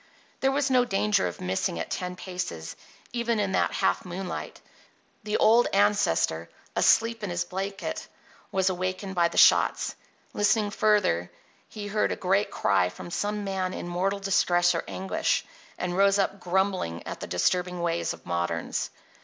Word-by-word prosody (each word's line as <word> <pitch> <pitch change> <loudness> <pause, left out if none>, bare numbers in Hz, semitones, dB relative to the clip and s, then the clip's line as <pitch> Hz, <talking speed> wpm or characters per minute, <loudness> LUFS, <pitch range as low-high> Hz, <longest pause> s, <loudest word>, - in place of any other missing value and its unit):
There 270 - +2
was 275 0 0
no 250 -1 +5
danger 210 - +1
of 90 - -7
missing 90 -2 -1
at 85 - -5
ten 180 0 -3
paces, 180 - -5 0.4
even 235 -2 0
in 200 -2 0
that - - +1
half - - +1
moonlight. 180 0 -6 0.6
The 210 -1 -1
old 235 +2 +5
ancestor, 200 - +2 0.3
asleep 230 0 +3
on 205 - -3
his 175 0 -1
blanket, 195 +1 -4 0.4
was 190 -1 +1
awakened 185 +2 -3
by 175 -2 +3
the 170 - -7
shots. - - +5 0.4
Listening 205 0 +2
further, 205 - +2 0.4
he 210 -1 -7
heard 210 +1 0
a - - -1
great 195 +3 +1
cry 95 -4 +2
from 175 - -10
some 205 +3 -2
man 190 -2 -2
in - - -5
mortal 185 +3 0
distress 175 -3 +3
or - - -2
anguish, 190 +1 -1 0.3
and 175 0 -2
rose 195 +1 +4
up 195 0 0
grumbling 185 - -1
at - - -6
the - - -6
disturbing 180 - 0
ways 170 0 0
of - - -10
moderns. 85 -1 -2
190 Hz, 160 wpm, -27 LUFS, 175-205 Hz, 0.6 s, no